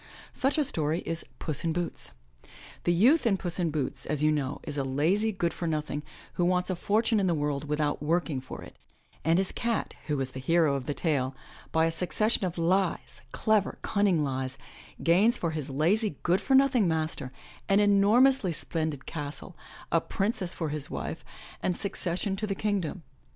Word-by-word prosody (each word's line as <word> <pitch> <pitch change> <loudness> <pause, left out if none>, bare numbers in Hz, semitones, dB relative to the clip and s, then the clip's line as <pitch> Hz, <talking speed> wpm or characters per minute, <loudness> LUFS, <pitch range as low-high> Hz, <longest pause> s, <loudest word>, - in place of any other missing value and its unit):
Such 270 +4 +1
a 305 - +4
story 160 - -1
is 165 0 +1 0.2
*Tuss 155 -3 -1
in 165 -1 0
Boots." 175 - -2 0.7
The 175 - +4
youth 240 - +4
in 195 -4 +3
*Tuss 175 -1 -2
in 170 -2 +1
Boots,*' 150 -4 -2
as 150 -1 0
you 155 - +5
know, 145 -3 -1
is - - -4
a 140 - 0
lazy 165 +12 +1
good 170 -4 -1
for 170 - -4
nothing 150 -2 -2 0.3
who 175 - 0
wants 180 +1 +2
a - - -1
fortune 220 +4 +2
in 195 - +2
the 170 - +2
world 145 -1 -1
without 150 -1 -1
working 155 -3 0
for 130 - -8
it; - - -13 0.5
and 165 +2 +3
his 190 0 0
cat, 235 -2 -1
who 150 -2 0
is 130 -1 -2
the 130 - -7
hero 160 +2 +3
of 135 -2 -3
the 145 - -1
tale, 135 -5 0 0.4
by 160 0 +3
a 165 - +1
succession 190 +6 0
of 175 - -6
lies, 180 +2 0
clever, 215 -3 +1
cunning 200 -7 +2
lies, 130 -1 -3 0.5
gains 200 +8 +4
for 170 - -1
his 155 -3 -4
lazy, 165 - +1
good 180 +3 +2
for 270 - +2
nothing 265 -6 +4
master 155 -5 -1 0.4
an 195 +1 +5
enormously 210 +2 +4
splendid 155 -3 -3
castle, 145 -2 -6 0.4
a - - +3
princess 195 -3 -1
for 160 -4 -3
his 145 -1 -4
wife - - -5 0.4
and 180 - 0
succession 190 0 -2
to 215 +2 -2
the 195 - -1
Kingdom. 190 -5 -2
170 Hz, 190 wpm, -28 LUFS, 150-200 Hz, 0.7 s, you